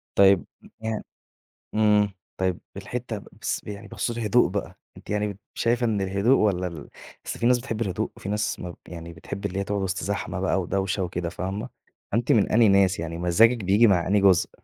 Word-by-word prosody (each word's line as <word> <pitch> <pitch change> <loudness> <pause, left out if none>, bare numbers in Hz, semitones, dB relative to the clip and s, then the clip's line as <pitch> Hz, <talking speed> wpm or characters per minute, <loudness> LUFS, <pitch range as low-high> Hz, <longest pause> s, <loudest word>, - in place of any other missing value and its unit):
طيب، 100 -2 +6 0.2
م - - -14
يعن 110 -1 -2 0.7
إمم، 105 -1 +4 0.3
طيب 95 -2 0 0.2
الحِتّة 110 +1 -5 0.2
بس - - -1
ب - - -14
يعني 100 -1 -7
بخصوص 120 -1 -3
الهدوء 115 +2 +3
بَقى، - - -4 0.2
أنتِ - - -15
يعني 105 0 0
ب - - -18 0.2
شايفة 120 +1 +1
إن 105 -3 0
الهدوء 100 +7 +3
والّا 90 -4 +1
ال 80 -4 -9 0.4
أصل - - -4
في - - 0
ناس 125 0 +5
بتحب 115 -3 -4
الهدوء، 95 -5 -1
وفي 95 - -7
ناس 105 +1 -1
ما 90 - -5
ب 85 - -9
يعني 85 -1 -8
بتحب 100 +4 -7
اللي 100 -1 -2
هي 100 - 0
تقعد 100 0 -2
وسط 95 -2 -2
زحمة 95 -1 -3
بَقى 95 0 +1
ودوشة 95 +1 -1
وكده، 85 -1 -3
فاهمة؟ 95 +4 -4 0.4
فأنتِ 115 +3 +1
من 105 -4 +3
أنهي 115 0 +6
ناس؟ 100 -2 +4
يعني 85 0 -4
مزاجِك 105 +8 +4
بييجي 100 +5 +5
مع 90 -4 +3
أنهي 100 +2 +3
جزء؟ 95 -3 +4
100 Hz, 205 wpm, -25 LUFS, 90-110 Hz, 0.7 s, طيب